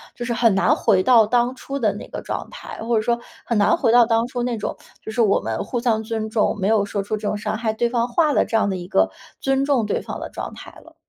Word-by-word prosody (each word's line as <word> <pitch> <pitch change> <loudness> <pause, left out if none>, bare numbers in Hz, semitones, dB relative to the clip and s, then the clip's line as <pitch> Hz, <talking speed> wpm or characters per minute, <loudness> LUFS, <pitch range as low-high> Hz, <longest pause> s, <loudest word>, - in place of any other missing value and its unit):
就 240 - -5
是 240 - -1
很 230 -2 +3
难 195 - +3
回 185 - +3
到 230 +1 +6
当 245 +3 +1
初 275 +1 -5
的 215 -6 +1
那 205 - -8
个 - - -6
状 - - -5
态， - - -9
或 230 0 +1
者 - - +2
说 235 +2 +1 0.3
很 235 - 0
难 205 - +4
回 265 -9 +1
到 240 -1 +7
当 230 0 +1
初 245 -1 -3
那 240 -1 -1
种， 210 - -4 0.3
就 - - -9
是 235 - 0
我 205 -3 +3
们 110 0 -3
互 245 - -3
相 230 -2 +1
尊 220 -1 -3
重， 215 0 +1
没 190 - 0
有 215 -1 +3
说 200 0 -3
出 210 +2 -2
这 210 0 -4
种 210 - -1
伤 210 +1 -3
害 225 -1 -1
对 235 +2 0
方 235 -1 0
话 300 +4 +2
的 - - +3
这 225 - 0
样 210 - +1
的 190 - -1
一 175 -1 -7
个 95 - +2 0.3
尊 270 0 +1
重 270 -6 +2
对 210 - -1
方 - - -6
的 - - -6
状 - - -6
态 - - -11
了。 - - -18
225 Hz, 310 characters per minute, -22 LUFS, 210-240 Hz, 0.3 s, 到